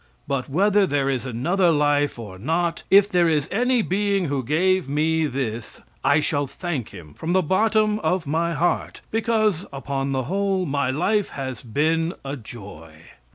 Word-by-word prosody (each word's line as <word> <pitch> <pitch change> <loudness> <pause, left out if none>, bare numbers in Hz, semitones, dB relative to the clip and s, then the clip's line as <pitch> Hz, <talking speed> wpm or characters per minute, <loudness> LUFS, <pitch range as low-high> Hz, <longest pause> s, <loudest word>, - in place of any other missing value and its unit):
But 135 -1 -2
whether 200 +6 +3
there 140 -2 +1
is 130 0 -3
another 170 +10 +1
life 145 -2 +2
or 105 -5 -9
not, 165 - -1
if 200 +1 +7
there 175 -4 +2
is 150 -3 +1
any 245 +2 +2
being 200 0 0
who 140 -3 -1
gave 175 +4 +1
me 155 +2 +1
this, 120 -5 -4 0.2
I 145 +2 +4
shall 145 -2 -1
thank 150 - -4
him 85 -7 -12
from 165 - -3
the 185 0 +3
bottom 215 +4 +2
of 170 +1 0
my 165 +4 0
heart, 170 +4 -1
because, 215 -5 +1
upon 135 0 -3
the 130 -1 -1
whole, 195 +5 0
my 140 -3 0
life 195 +9 +1
has 130 -4 -5
been 160 - 0
a 135 +1 -3
joy. 105 - -11
155 Hz, 165 wpm, -23 LUFS, 135-190 Hz, 0.2 s, if